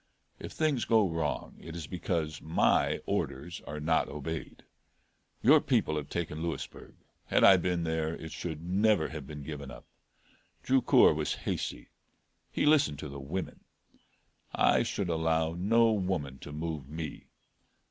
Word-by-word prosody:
If - - -7
things 150 -6 +1
go 110 -3 +4
wrong 80 -3 -3
it 80 - -9
is 85 -3 -5
because 80 -2 -3
my 80 +1 +2
orders 85 +6 -3
are 75 +1 -5
not 80 +2 +1
obeyed. 75 +2 -6 0.8
Your - - +7
people 75 - +1
have 75 -2 -4
taken 80 -2 -3
Louisburg; 85 -1 -5 0.3
had - - +3
I 95 - +9
been 90 -1 -1
there, 80 0 -1
it 80 - -8
should 80 -2 -5
never 95 -1 +2
have 75 -3 -7
been 75 -1 -8
given 70 -2 -7
up. - - -11 0.8
Drucour 130 -1 +5
was - - -1
hasty - - -3 0.6
he - - 0
listened 145 - +4
to 75 - -6
the 70 0 -7
women. 80 +8 -5 1.0
I - - +4
should 100 - -2
allow 80 0 +1
no 115 +6 +3
woman 90 -10 -2
to 75 - -9
move 75 -2 -5
me. 80 0 -6
80 Hz, 145 wpm, -30 LUFS, 75-90 Hz, 1.0 s, I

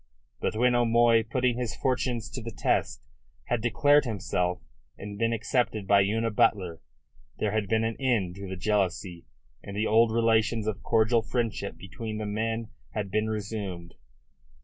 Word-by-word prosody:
But - - -1
when 125 +2 +3
O'Moy, 120 -1 +4
putting 125 +2 0
his 120 -3 -3
fortunes 125 -4 -1
to 125 - -5
the 115 - -6
test, 110 - -1 0.5
had 120 -2 +1
declared 145 +6 +4
himself 90 -6 -2 0.3
and 100 +1 -7
been 115 0 +2
accepted 110 -1 0
by 100 +1 +5
Una 110 +3 0
Butler, 100 -7 +1 0.6
there 105 - 0
had 110 -1 -1
been 110 0 +2
an 115 -1 -2
end 115 -9 +1
to 100 0 -7
the 95 - -4
jealousy, 90 -3 -1 0.3
and 100 0 -8
the 110 - +1
old 115 +1 +4
relations 115 -1 +2
of 110 -1 -3
cordial 115 +1 +3
friendship 110 -3 -3
between 110 +2 -6
the 110 - -3
men 110 +2 -2 0.3
had 100 -3 -3
been 110 +2 0
resumed. 100 -5 -5
110 Hz, 160 wpm, -27 LUFS, 100-115 Hz, 0.6 s, by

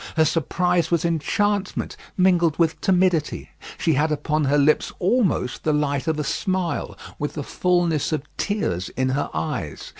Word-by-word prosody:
Her 160 - +5
surprise 170 +2 +1
was 170 -1 +1
enchantment 200 +5 0 0.2
mingled 175 -4 +3
with 165 -2 +1
timidity. 180 -5 +1 0.3
She 160 - +1
had 150 +3 +1
upon 150 0 0
her 140 +2 +3
lips 145 +1 +3
almost 190 - 0
the 155 - +1
light 145 0 0
of 160 -1 +1
a 150 - -1
smile, 185 +4 -2 0.2
with 145 - -2
the 150 - -3
fulness 175 -2 +1
of 155 -3 -1
tears 95 - -2
in 130 0 +1
her 135 +2 -1
eyes. 115 - -4
160 Hz, 155 wpm, -23 LUFS, 145-180 Hz, 0.3 s, Her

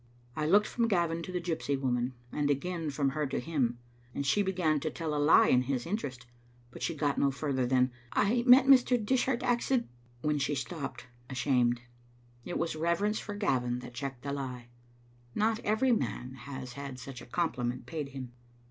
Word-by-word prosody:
I 155 -1 -1
looked 205 +5 +5
from 235 +1 0
Gavin 170 -5 +1
to 185 - -6
the 180 - -1
gypsy 160 -5 -2
woman, 125 -1 -1 0.2
and 145 -1 0
again 165 +3 -1
from 140 -1 0
her 150 +2 -1
to 135 - -2
him, 125 -5 0 0.4
and 140 - -2
she 205 +9 +3
began 180 -6 +1
to 155 - -2
tell 160 -1 -3
a 145 - 0
lie 155 - +6
in 125 - +5
his 130 -1 -2
interest. 140 - -4 0.5
But - - -11
she 165 - -1
got 145 -2 0
no 140 - +4
farther 135 -2 -1
than 130 0 +3
" 120 - -28
I 230 +4 +2
met 255 +2 +9
Mr. 255 -2 +6
Dis 245 +3 +1
hart 255 -2 0
accid 245 0 +1 0.2
" 120 0 -30
when 150 -1 +1
she 140 +1 0
stopped, 140 0 -5 0.2
ashamed. 125 -2 +1 0.6
It 175 - -3
was 170 - -1
Digitized - - -2
by 155 - -7
VjOOQ - - -6
IC - - -1
reverence 200 +6 +1
for 205 - -6
Gavin 125 - 0
that 125 - -10
checked 130 0 -5
the 140 0 -3
lie. 125 -3 -5 0.7
Not 220 +1 +2
every 220 +5 +2
man 130 - -1
has 130 0 -8
had 140 -1 -7
such 125 0 -8
a - - -12
compliment 125 -5 -1
paid 150 -4 -4
him. 130 -2 -7
145 Hz, 210 wpm, -31 LUFS, 130-180 Hz, 0.7 s, met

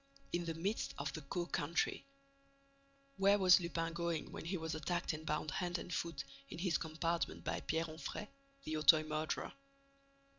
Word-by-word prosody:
In 175 0 0
the 165 -1 -2
midst 195 +7 -1
of 140 0 -2
the 160 - -5
Caux 175 +5 -2
country. 160 +4 0 1.1
Where 200 +1 +6
was 185 -2 +8
Lupin 165 -1 -1
going 170 -2 -1
when - - -6
he 185 +3 -1
was 160 -1 -3
attacked 170 +2 -1
and 155 +1 -7
bound 150 0 0
hand 180 -1 -1
and 175 - -6
foot, 165 -5 -2 0.3
in - - -6
his 175 0 +1
compartment 165 +1 -1
by - - -1
Pierre 160 +1 0
Onfrey, 160 +6 -5 0.4
the 155 - -2
Auteuil 155 +1 +7
murderer? 155 0 -2
165 Hz, 170 wpm, -37 LUFS, 155-175 Hz, 1.1 s, was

